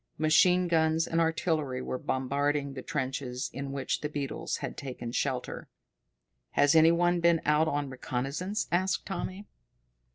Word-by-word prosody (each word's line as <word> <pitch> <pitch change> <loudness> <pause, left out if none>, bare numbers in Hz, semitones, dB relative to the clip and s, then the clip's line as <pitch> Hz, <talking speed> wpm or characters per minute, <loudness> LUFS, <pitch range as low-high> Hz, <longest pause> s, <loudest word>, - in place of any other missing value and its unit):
Machine 180 +4 +4
guns 160 -1 +2
and 165 0 0
artillery 160 -5 0
were 130 0 -4
bombarding 140 +2 -1
the 130 - -6
trenches 130 -2 -3
in 140 +1 -5
which 135 -1 -2
the 150 - -2
beetles 145 -2 -3
had - - -5
taken 125 -3 -6
shelter. 130 0 -3 0.8
"Has 145 +1 +4
any 160 0 +7
one 175 +1 +2
been 170 -1 +4
out 150 +2 +3
on 145 -1 -1
reconnaissance?" 135 - -3
asked 185 +2 +1
Tommy. 190 +1 -5
150 Hz, 140 wpm, -29 LUFS, 135-165 Hz, 0.8 s, any